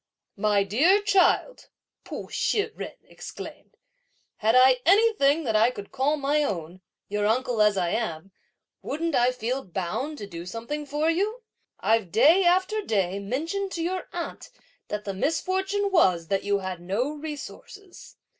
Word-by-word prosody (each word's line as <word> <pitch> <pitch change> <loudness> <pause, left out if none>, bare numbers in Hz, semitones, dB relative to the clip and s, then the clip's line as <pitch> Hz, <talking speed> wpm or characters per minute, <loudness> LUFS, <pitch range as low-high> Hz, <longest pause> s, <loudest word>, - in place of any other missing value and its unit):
"My 205 -1 +2
dear 290 - +4
child," 410 +4 +2 0.4
Pu - - -7
Shih 435 +1 0
jen - - -6
exclaimed, - - -10 0.6
"had 220 +2 +2
I 255 0 +6
anything 350 -6 +4
that 225 -5 -1
I 220 +3 +5
could 205 -5 -9
call 275 +3 +1
my 290 +1 +1
own, 180 - -4 0.3
your 205 0 0
uncle 245 0 +1
as 210 -1 +4
I 175 -2 +1
am, 195 -5 -3 0.5
wouldn't 330 +2 -3
I 245 -1 +3
feel 250 +2 -3
bound 210 - -4
to 205 - -6
do 170 -3 -8
something 240 +9 -5
for 300 +3 +1
you? 425 +8 -2 0.4
I've 220 -5 +1
day 320 - +5
after 375 +5 +2
day 195 - -1
mentioned 325 - -3
to 335 - -3
your 365 +2 -3
aunt 345 -1 -6 0.4
that 210 0 -4
the 200 - -3
misfortune 380 - -1
was 180 - +3
that 195 -1 0
you 200 0 +1
had 185 -3 -5
no 205 +11 -1
resources. 315 +5 -9
260 Hz, 155 wpm, -26 LUFS, 205-340 Hz, 0.6 s, I